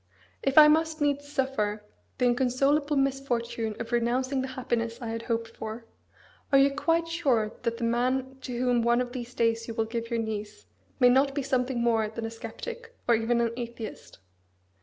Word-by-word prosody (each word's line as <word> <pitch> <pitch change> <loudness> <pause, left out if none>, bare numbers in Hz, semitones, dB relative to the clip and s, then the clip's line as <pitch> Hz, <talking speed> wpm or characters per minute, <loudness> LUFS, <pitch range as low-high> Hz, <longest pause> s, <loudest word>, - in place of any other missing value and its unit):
If 275 +1 -1
I 305 -1 +11
must 320 +1 +2
needs 285 -1 0
suffer 215 -7 -1 0.3
the 250 - +2
inconsolable 275 +4 +2
misfortune 240 -5 -1
of 230 - -5
renouncing 255 +3 +1
the 260 - -3
happiness 230 -2 -2
I 235 -3 -5
had 225 0 -3
hoped 230 -1 -2
for, 225 +1 -7 0.7
are 275 - +6
you 275 +1 +5
quite 330 +4 +1
sure 265 -11 +1
that 230 0 -1
the 235 - -5
man 255 +3 0
to 250 -2 -5
whom 245 -1 +2
one 235 +1 +3
of 250 -1 -2
these 245 -1 -6
days 230 0 +1
you 230 - -5
will 225 -1 +1
give 230 +1 -4
your 235 - -1
niece 215 -2 -5 0.3
may 250 -1 +7
not 275 +2 +3
be 285 - -1
something 255 -2 0
more 225 -2 +2
than 225 +1 -5
a 225 - -4
sceptic, 465 - -8
or 240 - +5
even 230 +1 +2
an 230 -1 +1
atheist?" 235 -2 -7
245 Hz, 185 wpm, -28 LUFS, 230-275 Hz, 0.7 s, I